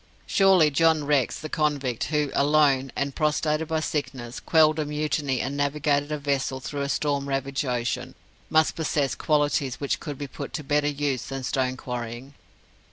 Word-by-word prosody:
Surely 190 -6 +4
John 160 +1 +3
Rex, 140 -3 +1
the 155 - -5
convict, 145 -7 -1
who, 150 -2 0
alone, 140 -2 +3
and 140 0 -2
prostrated 155 +1 0
by 160 0 0
sickness, 130 -6 -4
quelled 155 -1 +4
a 155 - 0
mutiny 150 -3 -1
and 135 +2 -3
navigated 145 0 0
a 150 - -1
vessel 140 -2 -1
through 140 +3 -5
a 140 - -2
storm 140 -1 -1
ravaged 135 +1 -1
ocean, 125 +1 -2 0.3
must 160 -1 +3
possess 150 -5 0
qualities 145 -4 +1
which 140 - -1
could 145 -4 -6
be 145 - -4
put 135 - -8
to 150 - -4
better 145 +1 +1
use 145 -3 -1
than 135 -1 -5
stone 130 0 -1
quarrying. 125 +2 -6
145 Hz, 165 wpm, -25 LUFS, 135-150 Hz, 0.3 s, Surely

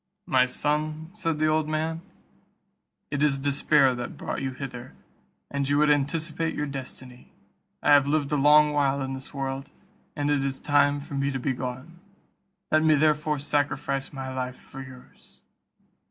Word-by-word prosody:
"My 130 -1 +3
son," 155 +4 -2
said 165 -8 -2
the 155 - +1
old 155 0 +1
man, 160 +1 -2 1.1
"it 145 -1 -1
is 145 -2 +3
despair 140 0 +3
that 120 -1 -6
brought - - -4
you 135 - -1
hither, 130 -1 -8 0.6
and 140 -1 -1
you 145 - +3
would 150 0 +4
anticipate 155 +3 0
your 150 - -1
destiny. 130 -2 -9 0.5
I - - +4
have 145 -1 +6
lived 145 -1 0
a - - +2
long 150 +1 +5
while 140 -1 +1
in 135 0 -4
the 130 0 -7
world, 135 0 -4 0.5
and 145 0 0
it 140 -2 +1
is 135 -1 -2
time 145 -1 +2
for 145 - -10
me 140 0 0
to 135 -1 -3
be 130 +1 -1
gone; 130 +7 -6 0.7
let 155 - +4
me 155 -1 +5
therefore 150 0 +2
sacrifice 140 -1 -1
my 130 -2 -6
life 130 -1 -3
for 135 - -10
yours." 130 -1 -15
145 Hz, 170 wpm, -26 LUFS, 135-150 Hz, 1.1 s, have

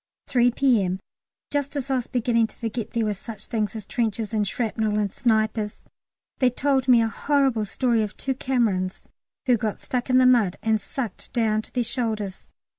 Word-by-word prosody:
3 245 -2 +3
P.M. 225 -8 +2 0.5
Just 285 0 -1
as 275 -1 -2
I 265 - +3
was 245 - -3
beginning 230 -2 +2
to - - -18
forget 230 -1 -4
there 230 -1 +1
were 210 - 0
such 210 +1 -9
things 215 -3 -2
as 215 -3 -6
trenches 225 -1 -2
and 210 -2 +1
shrapnel 220 -1 -1
and 205 -2 0
snipers, 220 -2 0 0.6
they 255 - +5
told 265 +1 +1
me 240 -3 +6
a - - +1
horrible 265 -2 +1
story 235 +2 +1
of 210 -1 -4
two 270 - -1
Camerons 225 -9 -1 0.4
who 250 -2 +4
got 215 -1 -2
stuck 250 0 -3
in 255 - +5
the 255 - +6
mud 235 -8 +4
and 220 -1 +2
sucked 235 -2 -5
down 220 -3 +2
to - - -14
their 245 - +1
shoulders. 220 -5 -3
230 Hz, 190 wpm, -24 LUFS, 215-255 Hz, 0.6 s, me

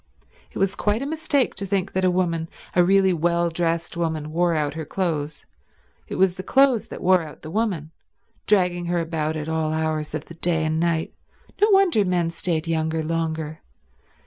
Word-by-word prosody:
It - - -9
was 195 -1 +1
quite 210 +5 0
a - - -3
mistake 300 -2 0
to 195 - -4
think 195 0 -1
that 190 - 0
a 185 - +4
woman, 170 -3 0 0.3
a 180 - +6
really 190 +1 +4
well 170 +1 +1
dressed 165 0 -1
woman, 160 -3 -2
wore 170 +1 +2
out 150 -2 0
her 160 +1 -5
clothes; 155 -3 -3 0.6
it - - -5
was 190 -1 +3
the - - -3
clothes 265 +1 +3
that - - -8
wore 185 0 +5
out 155 -2 -10
the 155 - -7
woman—dragging 180 -1 -2
her 175 0 0
about 160 -2 -1
at 155 -1 -4
all 160 -1 0
hours 155 -1 -1
of 155 - -5
the - - -11
day 165 -1 0
and 155 0 0
night. 165 -1 0 0.5
No 420 - +5
wonder 385 - +4
men 175 -3 0
stayed 165 -1 -1
younger 160 0 0
longer. 160 -1 -3
170 Hz, 185 wpm, -23 LUFS, 160-185 Hz, 0.6 s, a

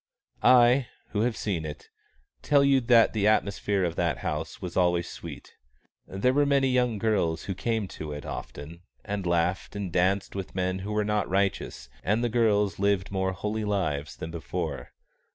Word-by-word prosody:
I, 125 +1 +6 0.2
who 105 - -1
have 115 0 0
seen 95 -7 -2
it, 75 -1 -8 0.5
tell 145 -1 +4
you 135 -1 +4
that 115 -1 +5
the 105 -2 +1
atmosphere 100 -2 +1
of 85 -2 -1
that 85 -6 +1
house 75 +8 -3
was 90 -4 -6
always 90 -1 +2
sweet. - - -9 0.5
There 100 +7 +1
were 145 +1 +3
many 140 -1 +3
young 125 -3 +1
girls 100 -7 0
who 95 - -3
came 110 +2 -1
to 75 -1 -7
it 75 -1 -6
often, 80 +4 -7 0.2
and 100 -3 -3
laughed 85 +3 0
and 100 -3 -4
danced 95 +2 +1
with 95 -2 -6
men 95 0 -1
who 100 +3 -5
were 105 0 0
not 105 -2 0
righteous, 95 -10 -1 0.2
and 110 +4 +1
the 120 - +1
girls 105 -4 +2
lived 100 -2 +1
more 95 -1 0
holy 105 +4 -3
lives 80 -9 -1
than 80 - -7
before. 80 -5 -4
100 Hz, 175 wpm, -27 LUFS, 85-110 Hz, 0.5 s, I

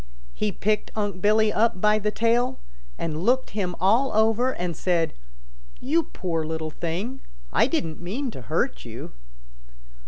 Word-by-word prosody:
He 210 -1 -1
picked 210 +2 0
Unc' 205 -4 -2
Billy 215 +1 +4
up 220 -4 +2
by 210 +2 +4
the 210 0 0
tail, 235 +4 +1 0.4
and 155 -1 -3
looked 255 +4 +2
him 185 -4 -2
all 225 +9 +4
over, 225 +4 +3
and 175 -7 -3
said, 170 0 +1 0.7
'You 305 +7 +2
poor 165 -3 -2
little 160 0 -3
thing. 190 - -3 0.3
I - - +4
didn't 160 -1 -2
mean 235 +9 -3
to 130 - -8
hurt 65 - -1
you.' - - -8
210 Hz, 150 wpm, -25 LUFS, 175-230 Hz, 0.7 s, Billy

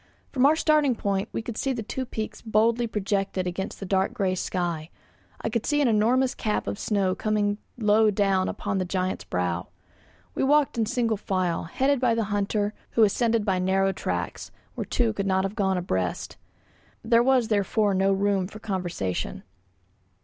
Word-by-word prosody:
From 260 0 +4
our 305 - +4
starting 305 -5 +3
point 200 -2 -1
we - - -3
could 230 -1 -6
see 270 - 0
the 230 -3 -4
two 260 +4 -4
peaks 220 -2 -5
boldly 230 +2 +2
projected 195 -3 -1
against 185 +2 -4
the 195 - -5
dark 190 +1 0
grey 190 -2 +1
sky; 175 -3 -2 0.5
I - - -1
could 230 0 -1
see 295 - +1
an 285 - +3
enormous 240 +4 +3
cap 210 -1 -2
of 200 - -4
snow 195 -3 +1
coming 210 0 0 0.2
low 215 -1 +4
down 195 -2 +1
upon 195 - -2
the - - +1
giant's 185 - -2
brow. 90 -1 -2 0.7
We - - -1
walked 290 +1 +3
in 225 -2 0
single 230 -2 0
file, 185 -4 -1
headed 270 +11 +1
by 240 -2 +2
the 230 - +1
hunter, 205 +1 0 0.2
who 230 - +5
ascended 225 +1 +2
by 190 -3 +1
narrow 190 +1 +2
tracks, - - -4 0.2
where - - -4
two 230 -3 +1
could 200 -2 -2
not 190 0 +2
have 195 +1 -2
gone 190 -3 +1
abreast. 95 - -2 0.7
There 230 +1 +4
was 255 -2 +3
therefore 205 0 +2
no 190 +1 +2
room 195 -1 +1
for 210 - -10
conversation. 180 - -3
205 Hz, 180 wpm, -26 LUFS, 190-230 Hz, 0.7 s, who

